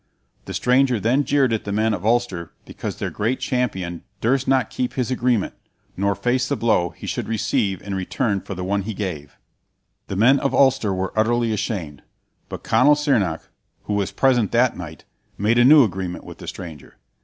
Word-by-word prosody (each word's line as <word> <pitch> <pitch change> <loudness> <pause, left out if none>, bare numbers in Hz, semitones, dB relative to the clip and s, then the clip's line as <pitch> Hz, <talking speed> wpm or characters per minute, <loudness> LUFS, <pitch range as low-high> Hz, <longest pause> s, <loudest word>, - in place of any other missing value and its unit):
The 95 - -6
stranger 125 +4 +2
then 125 +7 +1
jeered 135 -5 +2
at 110 - -1
the 100 - -5
men 110 +2 +1
of 95 -3 -4
Ulster 110 -7 0
because - - -6
their - - -4
great 115 +5 -1
champion 95 -9 -2 0.2
durst 135 +3 +1
not 130 -3 +2
keep 125 -1 -2
his 130 -1 -2
agreement, 120 -4 0 0.4
nor 100 +1 0
face 125 +5 0
the 140 - +1
blow 105 -8 +1
he 85 - -12
should - - -3
receive 100 -3 -1
in 100 - -5
return 100 +2 -1
for 95 - -7
the 90 - -5
one 100 +2 0
he 105 +2 -5
gave. 80 -9 -5 0.7
The - - -4
men 125 +8 +5
of 140 - -1
Ulster 130 -6 +3
were 95 0 -2
utterly 115 +1 +1
ashamed, 95 - -4 0.5
but - - -7
Conall 130 +7 +4
Cearnach, 115 - 0 0.4
who 105 - -3
was 100 -1 -1
present 120 -1 +2
that 120 +1 +3
night, 80 -4 -9 0.3
made 110 +4 +2
a - - +6
new 145 +2 +8
agreement 95 -4 -3
with - - -11
the - - -10
stranger. 80 -6 -9
110 Hz, 190 wpm, -22 LUFS, 95-125 Hz, 0.7 s, new